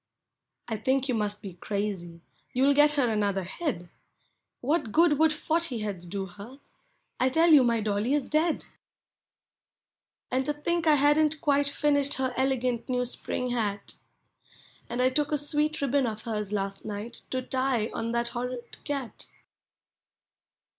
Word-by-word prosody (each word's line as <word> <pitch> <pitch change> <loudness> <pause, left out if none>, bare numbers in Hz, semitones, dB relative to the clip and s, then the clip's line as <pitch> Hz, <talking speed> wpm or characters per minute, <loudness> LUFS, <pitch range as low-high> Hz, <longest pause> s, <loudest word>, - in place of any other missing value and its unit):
I 225 - -2
think 260 +5 +1
you 255 - 0
must 210 -2 -2
be 195 -3 -7
crazy— 180 -3 -4 0.3
you 255 - +2
*11 280 +1 +5
get 295 +1 +6
her 280 -4 +2
another 205 -3 0
head! 185 - -4 0.7
What 280 -3 0
good 310 0 +4
would 320 0 +5
forty 310 -5 -1
heads 195 -4 -4
do 195 +2 -3
her? 205 +9 -11 0.6
I 260 - +3
tell 325 +5 +4
you 290 -4 +8
my 235 -2 +2
dolly 210 +5 0
is 290 - 0
dead! 315 +1 +1 1.7
And 260 +1 +1
to 295 - +1
think 335 +3 -1
I 305 - +7
hadn't 295 +2 +3
quite 285 -1 +2
finished 285 -1 +2
her 260 -1 -1
elegant 255 -2 0
new 250 -1 +1
spring 250 0 -2
hat! 205 -4 -2 1.0
And 245 +1 0
I 255 - +4
took 295 +2 0
a 300 - +2
sweet 300 +1 0
ribbon 275 -1 +2
of 220 -1 -5
hers 210 -3 -3
last 195 -1 -3
night 215 +2 -6
to 260 - -1
tie 255 -4 0
on 230 0 -3
that 235 0 0
horrid 245 0 -6
cat! 275 -5 -4
255 Hz, 155 wpm, -28 LUFS, 215-290 Hz, 1.7 s, you